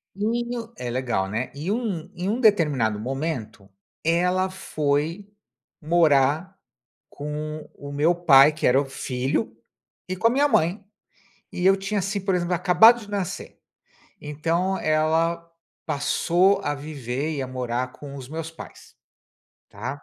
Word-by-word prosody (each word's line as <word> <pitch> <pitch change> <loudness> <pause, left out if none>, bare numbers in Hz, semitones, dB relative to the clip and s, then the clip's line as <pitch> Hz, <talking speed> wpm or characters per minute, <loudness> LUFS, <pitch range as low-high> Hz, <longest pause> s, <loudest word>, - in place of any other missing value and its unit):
Menino, 235 +2 -2
é 125 - -5
legal, 120 -6 -1
né. 110 +5 -3
E 150 +6 -4
um 200 -7 -2
e 180 +1 -3
um 225 +5 0
determinado 150 - +3
momento, 125 -5 -4 0.4
ela 180 +3 +2
foi 160 +1 -2 0.5
morar 160 +2 +2 0.5
com 150 +1 -6
o 140 0 -9
meu 150 +4 +2
pai, 150 -5 +6
que 155 - -1
era 125 +2 +5
o - - -4
filho, 135 - -2 0.5
e 185 - -3
com 185 +5 +2
a - - +4
minha 280 +4 +3
mãe. 185 - +1 0.7
E 180 - -3
eu 195 0 +6
tinha 195 +1 -2
assim, 195 +2 -2
por 195 0 0
exemplo, 180 0 0
acabado 220 +7 +6
de 210 -2 -12
nascer, 195 -4 -5 0.6
então 165 +6 -1
ela 165 +2 +1 0.4
passou 175 +7 +2
a 145 - 0
viver 140 0 -4
e 135 - -2
a - - -4
morar 125 0 -3
com 140 -1 -10
os 130 -2 -9
meus 160 +2 -5
pais, 165 - -13 0.7
tá. 130 +8 -6
160 Hz, 145 wpm, -24 LUFS, 140-190 Hz, 0.7 s, pai